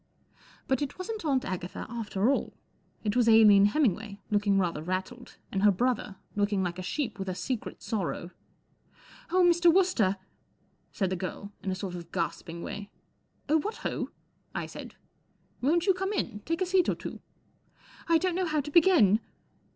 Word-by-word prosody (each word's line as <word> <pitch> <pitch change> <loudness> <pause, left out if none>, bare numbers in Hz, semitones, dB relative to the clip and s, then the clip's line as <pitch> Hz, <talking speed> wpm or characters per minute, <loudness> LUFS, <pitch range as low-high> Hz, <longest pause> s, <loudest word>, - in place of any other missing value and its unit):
But 265 0 +1
it 285 - -3
wasn't 425 +3 -5
Aunt 270 -4 +1
Agatha 180 -1 -4
after 225 0 0
all. - - -1 0.5
It 210 -2 0
wac 245 -2 +3
Aline 210 -3 +7
Hemmingway, 215 - 0
looking 205 -1 +3
rather 175 -5 0
rattled, 185 +9 -4
and 195 - -1
her 210 - +6
brother, 215 0 0 0.2
looking 205 -1 +1
like 175 0 -3
a - - -3
sheep 220 +3 -3
with 190 0 -3
a 185 - -3
secret 250 +3 -4
sorrow. 180 -4 -3 1.0
4 365 +2 +3
Oh, - - +6
Mr. 345 0 +5
Wooster! 365 - +3
99 190 - -33 0.7
said 190 -4 -1
the - - +1
girl, 190 +3 -5
in 195 - -3
a 185 - -1
sort 185 -1 -5
of 170 -1 -8
gasping 170 0 -3
way. 205 0 -6 0.6
4 305 +2 +4
Oh, - - +1
what 425 +9 -3
ho! - - -2 0.2
" - - -37
I - - -2
said. - - -9 0.3
" - - -38
Won't 330 +7 +2
you 385 - +5
come 385 +3 -2
in? 235 - -2
Take 330 +3 -1
a - - 0
seat 365 -1 +3
or - - +1
two." - - -7 0.9
1 335 - +5
don't 365 +2 0
know 365 +1 0
how 310 -1 +1
to 295 +1 -4
begin." 310 - +6
220 Hz, 190 wpm, -29 LUFS, 195-320 Hz, 1.0 s, Aline